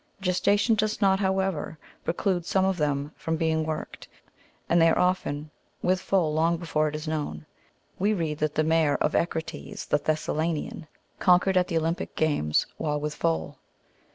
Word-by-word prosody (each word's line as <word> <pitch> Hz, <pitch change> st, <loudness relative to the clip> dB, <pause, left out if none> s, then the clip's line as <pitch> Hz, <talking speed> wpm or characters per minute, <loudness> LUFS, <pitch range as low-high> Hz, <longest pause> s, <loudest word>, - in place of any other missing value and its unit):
Gestation 200 Hz, +4 st, +2 dB
does 215 Hz, 0 st, 0 dB
not, 195 Hz, -2 st, +3 dB
however, 190 Hz, -5 st, -1 dB, 0.3 s
preclude 175 Hz, +1 st, 0 dB
some 190 Hz, +3 st, +1 dB
of 190 Hz, -1 st, +1 dB
them 145 Hz, -1 st, -1 dB
from 160 Hz, -, -2 dB
being 160 Hz, -1 st, +1 dB
worked, 155 Hz, 0 st, -5 dB, 0.6 s
and 170 Hz, 0 st, +4 dB
they 165 Hz, -, +6 dB
are -, -, +2 dB
often 155 Hz, -5 st, 0 dB, 0.3 s
with 185 Hz, +1 st, +2 dB
foal 170 Hz, -6 st, +1 dB
long 165 Hz, +2 st, +2 dB
before 155 Hz, -2 st, 0 dB
it 150 Hz, -, -4 dB
is 155 Hz, +1 st, -5 dB
known. 145 Hz, -, -3 dB, 0.5 s
We 210 Hz, +3 st, +2 dB
read 160 Hz, -4 st, -2 dB
that 150 Hz, -1 st, -1 dB
the 155 Hz, -, +2 dB
mare 160 Hz, -2 st, +3 dB
of 150 Hz, -, 0 dB
Echecrates, 160 Hz, -, -3 dB
the -, -, +1 dB
Thessalian, 155 Hz, +1 st, -2 dB, 0.3 s
conquered 185 Hz, +1 st, +4 dB
at 180 Hz, -1 st, +3 dB
the 165 Hz, -, 0 dB
Olympic 165 Hz, +2 st, -2 dB
games, 145 Hz, -, +1 dB
while 150 Hz, -1 st, -1 dB
with 150 Hz, 0 st, -3 dB
foal. 80 Hz, -, -2 dB
160 Hz, 165 wpm, -26 LUFS, 150-185 Hz, 0.6 s, they